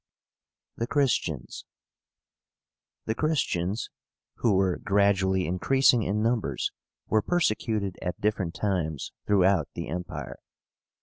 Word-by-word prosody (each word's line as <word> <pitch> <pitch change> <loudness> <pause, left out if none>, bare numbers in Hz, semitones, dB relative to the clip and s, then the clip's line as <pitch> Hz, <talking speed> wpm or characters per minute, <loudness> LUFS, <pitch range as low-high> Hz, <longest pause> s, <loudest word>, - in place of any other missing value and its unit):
THE 115 - -2
CHRISTIANS. 120 - 0 1.4
The 110 - 0
CHRISTIANS, 115 - -1 0.5
who 110 -5 +2
were 95 -2 +2
gradually 95 -2 +2
increasing 125 +8 +3
in 105 +1 0
numbers, 115 - 0 0.3
were 110 - +2
persecuted 110 - 0
at 90 -1 -3
different 100 -5 -1
times 85 -8 -2 0.2
throughout 95 -5 +3
the 85 - -5
Empire. 90 +2 -5
100 Hz, 100 wpm, -27 LUFS, 90-110 Hz, 1.4 s, increasing